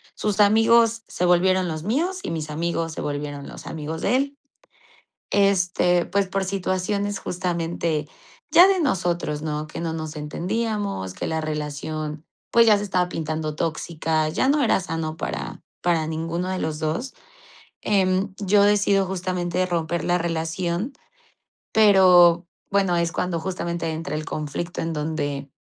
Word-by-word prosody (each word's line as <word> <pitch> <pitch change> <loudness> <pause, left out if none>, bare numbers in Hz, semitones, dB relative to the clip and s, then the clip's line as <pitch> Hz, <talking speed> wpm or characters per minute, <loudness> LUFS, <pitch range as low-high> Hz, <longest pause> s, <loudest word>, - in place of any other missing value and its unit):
Sus 210 -1 -2
amigos 225 +2 +4
se - - -4
volvieron 185 +1 +3
los 155 -1 -4
míos 330 - 0
y - - -3
mis 155 -2 -4
amigos 165 +1 -2
se - - -7
volvieron 145 -1 -4
los - - -10
amigos 160 +1 -5
de - - +2
él. 280 +1 -2 0.9
Este, 180 -3 +2
pues 200 0 +1
por 195 0 -1
situaciones 195 +1 -1
justamente 170 -3 -2 0.4
ya 355 - +8
de 385 -2 +2
nosotros, 175 - -1
¿no?, 150 -1 -3
que 155 - -8
no 165 -1 -2
nos 155 -1 -5
entendíamos, 195 - -2
que - - -4
la 160 0 -1
relación, 150 0 -4 0.3
pues 235 - +6
ya 210 -2 +6
se 205 - -3
estaba 180 -3 0
pintando 155 -1 -3
tóxica, 160 0 -1
ya 260 - +1
no 290 +1 +3
era 220 - +3
sano 165 -3 -4
para - - -4 0.2
para 170 -3 +1
ninguno 165 +3 -3
de 185 0 -2
los 155 -2 -2
dos. 160 - -2 0.7
Em, 190 -1 +1
yo 200 0 +3
decido 205 -1 +3
justamente 180 -1 -1
romper 170 -1 -1
la 175 0 +2
relación, 170 - -2 0.8
pero 180 -5 +6 0.2
bueno, 195 -3 +2
es 170 -1 +1
cuando 175 -1 -1
justamente 170 -1 -3
entra 160 -2 -4
el 155 0 -4
conflicto 155 +3 -4
en 165 0 -2
donde 145 -3 -3
175 Hz, 150 wpm, -23 LUFS, 160-195 Hz, 0.9 s, ya